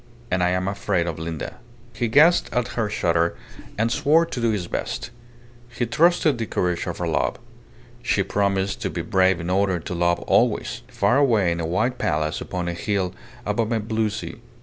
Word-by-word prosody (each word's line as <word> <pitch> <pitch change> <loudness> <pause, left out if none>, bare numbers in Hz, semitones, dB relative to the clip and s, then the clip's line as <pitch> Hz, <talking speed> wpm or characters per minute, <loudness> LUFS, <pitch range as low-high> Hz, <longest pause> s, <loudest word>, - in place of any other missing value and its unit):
And 95 - +1
I 90 - +3
am 90 +1 0
afraid 100 -3 0
of 85 -2 -4
Linda." 80 +4 -5 0.4
He 120 - -1
guessed 155 +9 +5
at 125 0 0
her 115 -3 -1
shudder, 85 -5 +1 0.4
and 115 +2 +1
swore 160 +7 +4
to 130 -7 -5
do 115 - +2
his 105 -5 -1
best. 120 - -4 0.6
He 120 0 -2
trusted 155 +1 +3
the 115 - -2
courage 90 -2 -1
of - - -3
her - - -2
love. - - 0 0.7
She - - +1
promised 100 -1 0
to - - -1
be - - -4
brave 95 0 +3
in 85 +1 -3
order 95 -1 +2
to 85 - -6
be 85 - -4
loved 85 0 +2
always - - +1
far 100 +6 +2
away 115 -11 +3
in 85 - -2
a 80 - -2
white 110 +9 0
palace 75 +1 0
upon 90 -2 -4
a 85 - -1
hill 95 0 -1 0.3
above 110 +2 0
a 115 - +1
blue 110 0 0
sea. 105 - -6
100 Hz, 195 wpm, -23 LUFS, 90-115 Hz, 0.7 s, guessed